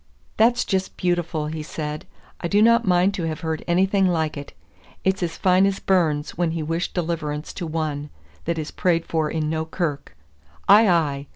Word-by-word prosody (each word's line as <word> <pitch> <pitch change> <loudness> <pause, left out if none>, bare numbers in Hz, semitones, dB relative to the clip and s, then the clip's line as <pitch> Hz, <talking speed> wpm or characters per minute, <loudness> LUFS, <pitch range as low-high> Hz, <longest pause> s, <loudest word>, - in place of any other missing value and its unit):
"That's 235 +2 +3
just 190 -1 -2
beautiful," 175 -3 -1
he 155 +1 -4
said. 150 0 -5 0.3
"I 170 - -2
do 200 +4 +2
not 230 -1 +4
mind 180 +2 +3
to 180 -4 -3
have 160 0 -4
heard 160 -2 -3
anything 190 +2 +3
like 160 -3 0
it; 145 -1 -8 0.5
it's 190 0 +1
as 170 -2 -2
fine 185 +1 +4
as 195 -1 -1
Burns 160 -7 +1
when 170 -1 -1
he 160 - -2
wished 165 +3 -3
deliverance 160 -3 -3
to 175 - -5
one 155 -2 -3 0.4
that 170 0 -1
is 155 -1 -4
prayed 170 -2 +1
for 160 -2 -1
in 155 -1 -2
no 160 +1 -1
kirk. 160 - -4 0.5
Ay, 210 +1 +7
ay! 145 -5 +1
165 Hz, 185 wpm, -23 LUFS, 155-185 Hz, 0.5 s, Ay